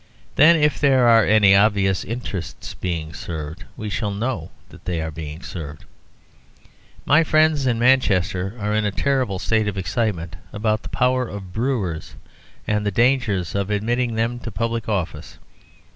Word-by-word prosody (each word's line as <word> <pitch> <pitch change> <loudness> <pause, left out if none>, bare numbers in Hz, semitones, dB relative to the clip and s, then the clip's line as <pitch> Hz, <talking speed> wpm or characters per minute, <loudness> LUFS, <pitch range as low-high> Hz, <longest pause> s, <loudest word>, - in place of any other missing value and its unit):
Then, 160 +4 +6
if 150 -2 +2
there 135 -4 +4
are 115 -1 +6
any 105 -2 +6
obvious 100 -2 +3
interests 105 -6 -6
being 80 -4 -4
served, 80 +1 -7
we 110 -3 -5
shall 105 +2 -1
know 100 -4 -3 0.2
that - - -16
they 85 -2 -2
are 80 0 -3
being 80 +1 -8
served. 75 -4 -8 1.2
My 155 +4 +5
friends 155 -3 +3
in 120 -2 +1
Manchester 100 -6 +2
are 105 0 -1
in 110 0 +1
a 105 - +1
terrible 130 -3 0
state 110 +3 0
of 100 -1 -3
excitement 90 -3 -2
about 110 0 -1
the - - -9
power 125 0 +1
of 95 -4 -8
brewers 110 -9 -2 0.5
and 105 0 0
the 105 - +1
dangers 115 -5 +1
of 100 0 -1
admitting 115 +3 0
them 115 +2 -1
to 120 - -6
public 115 +2 -3
office. 95 -6 -3
105 Hz, 160 wpm, -22 LUFS, 90-120 Hz, 1.2 s, Then